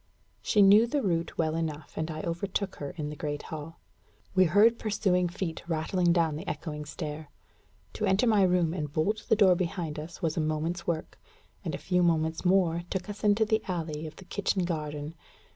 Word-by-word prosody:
She 210 -3 +4
knew 205 +4 +7
the 280 +2 -1
route 170 -3 -1
well 160 -1 +1
enough, 155 -3 -4
and 160 +1 -2
I 155 -1 -4
overtook 190 +3 -2
her 145 - -5
in 150 -2 -3
the - - -6
great 145 0 -4
hall. 160 +1 -8 0.5
We 185 -1 +5
heard 210 +7 +5
pursuing 190 -4 +1
feet 175 -2 -4
rattling 170 +2 +1
down 165 -3 +2
the - - -8
echoing 150 -2 -5
stair. 150 -1 -6 0.6
To - - -1
enter 195 +6 +3
my 215 -4 +4
room 180 -3 +3
and 150 -5 -3
bolt 195 +8 0
the 220 - +6
door 200 -4 +6
behind 170 -3 -2
us 160 +2 -8
was 160 -2 -1
a 165 - 0
moment's 155 +3 -2
work; 160 -2 -3 0.4
and - - -3
a - - -4
few 180 -1 +1
moments 160 -2 +1
more 180 -3 +3
took 190 +1 -3
us 205 - -11
into 210 +1 +4
the 220 +1 +1
alley 160 -4 -3
of 155 - -10
the 190 - -13
kitchen 195 -1 -1
garden. 150 -2 -4
170 Hz, 195 wpm, -29 LUFS, 155-190 Hz, 0.6 s, knew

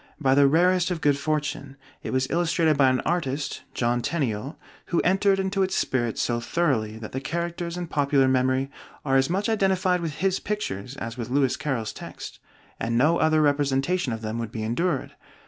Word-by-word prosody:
By 135 -3 +3
the 140 0 +6
rarest 175 +4 +3
of 180 -2 -2
good 145 -2 +3
fortune, 150 -2 -2 0.2
it - - -5
was 130 0 +1
illustrated 165 -2 +2
by 135 -1 +5
an 130 0 +1
artist 150 -5 -2
(John 120 0 +1
Tenniel) 135 -3 -2 0.3
who 170 - +1
entered 195 +2 +3
into 190 +1 0
its 190 0 +1
spirit 120 -3 0
so 120 -1 0
thoroughly 115 -5 0
that 110 -1 -8
the 130 - -3
characters 170 +3 -3
in 175 - -3
popular 140 -4 +2
memory 130 +1 +1 0.3
are 135 -2 +2
as 135 0 +2
much 195 +4 0
identified 190 -4 +2
with 160 -3 -3
his 190 +2 0
pictures 135 - -4
as 115 -1 -6
with 120 - -4
Lewis 135 -1 +2
Carroll's 120 -8 -3
text, - - -9 0.4
and 115 +1 -1
no 155 +7 +3
other 155 -1 +3
representation 145 +2 +1
of 115 0 -5
them 110 +2 -3
would 115 -2 -4
be 110 -3 -4
endured. 165 +11 -1
145 Hz, 185 wpm, -25 LUFS, 130-175 Hz, 0.4 s, the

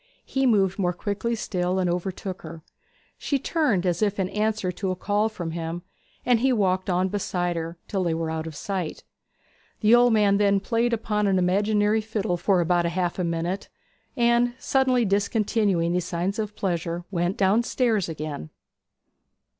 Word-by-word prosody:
He 270 -1 +1
moved 195 -4 +2
more 180 -2 +1
quickly 205 +5 -2
still, 185 -4 -1
and 185 -1 +1
overtook 185 +2 -3
her. 160 - -9 0.6
She 280 - 0
turned 265 - 0
as 175 0 0
if 205 -1 +1
in 185 -1 0
answer 210 -3 -1
to 190 +2 -3
a 185 - -1
call 205 +4 0
from 175 -6 -5
him, 165 +1 -4 0.4
and 245 -2 +4
he 265 +3 +2
walked 190 -4 +1
on 180 +1 +2
beside 180 -3 -2
her, 165 +1 -4
till 195 -3 -1
they 170 -2 0
were 165 -1 -2
out 160 0 -3
of 160 - -8
sight. 185 -1 -4 0.8
The 215 +1 +5
old 240 0 +6
man 205 -2 +4
then 200 -1 +3
played 230 +3 0
upon 210 -2 0
an 190 -1 +2
imaginary 205 +4 +2
fiddle 215 -4 -2
for 180 +1 +2
about 175 0 +2
half 175 +1 -1
a - - +1
minute; 170 +3 -2 0.5
and, 240 0 +3
suddenly 260 -3 +2
discontinuing 200 -3 +1
these 180 -1 0
signs 180 +4 -2
of 210 -1 -3
pleasure, 175 -2 -2
went 175 +1 -1
downstairs 215 0 +2
again. 150 - -5
195 Hz, 170 wpm, -25 LUFS, 175-215 Hz, 0.8 s, old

